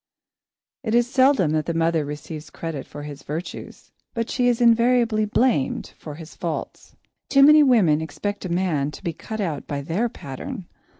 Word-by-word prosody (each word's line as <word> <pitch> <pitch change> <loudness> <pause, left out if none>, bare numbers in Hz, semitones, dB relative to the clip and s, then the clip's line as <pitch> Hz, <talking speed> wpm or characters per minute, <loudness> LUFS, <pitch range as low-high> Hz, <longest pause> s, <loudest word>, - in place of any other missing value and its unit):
It 230 -4 -1
is 240 0 +4
seldom 260 - +3
that 155 -1 0
the 170 - -1
mother 165 -1 +2
receives 150 +1 -7
credit 160 -3 -6
for 145 - -9
his 145 -1 -8
virtues, 160 +5 -7 0.2
but 230 -1 -2
she 245 -1 +1
is 240 -1 +2
invariably 235 -2 +4
blamed 215 - 0
for 150 -2 -9
his 160 0 -11
faults. 165 -3 -5 0.3
Too 275 0 +6
many 305 +2 +8
women 205 - +4
expect 205 +6 -4
a 185 - -4
man 170 -5 0
to 150 - -11
be 170 -3 -2
cut 220 +7 -7
out 165 -8 -3
by 140 -1 -3
their 190 +11 -1
pattern. 195 - -7
175 Hz, 175 wpm, -23 LUFS, 155-235 Hz, 0.3 s, many